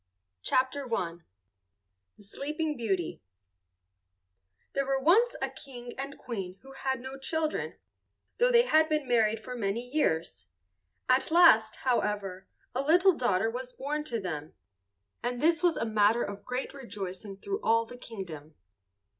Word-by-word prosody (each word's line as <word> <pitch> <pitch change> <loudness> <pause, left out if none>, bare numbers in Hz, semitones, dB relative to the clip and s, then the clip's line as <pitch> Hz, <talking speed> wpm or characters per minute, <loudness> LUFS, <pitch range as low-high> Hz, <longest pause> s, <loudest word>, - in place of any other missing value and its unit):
Mother's 260 +1 +1
Nursery - - -12
Tales 170 -6 -2 1.0
THE - - -16
SLEEPING 300 +8 -3
BEAUTY 195 - -2 1.5
There 275 -1 0
were 270 0 +1
once 420 - +4
a - - 0
King 245 -3 -9
and 275 +1 -6
Queen 195 -6 -5
who 270 - -12
had 265 -1 -2
no 265 +2 -8
children, 310 +3 -2 0.6
though - - +5
they 475 -1 +7
had 315 -9 +4
been 305 -3 0
married 225 -3 +3
for 250 +3 -7
many 215 0 -1
years. 160 - -1 0.6
At 255 +1 +3
last, 315 -11 +6
however, 205 -6 -1 0.3
a 255 - 0
little 355 +6 +5
daughter 225 - +1
was 250 +1 -6
born 295 +3 -3
to 235 -6 -2
them, 155 -6 -5 0.7
and 245 0 -2
this 325 +3 +3
was 350 -2 +3
a - - 0
matter 215 +1 +3
of 200 0 -6
great 250 +1 -3
rejoicing 200 -6 -6
through 400 - -3
all 230 0 +3
the 245 - -10
kingdom. 170 -11 -8
245 Hz, 145 wpm, -29 LUFS, 205-285 Hz, 1.5 s, they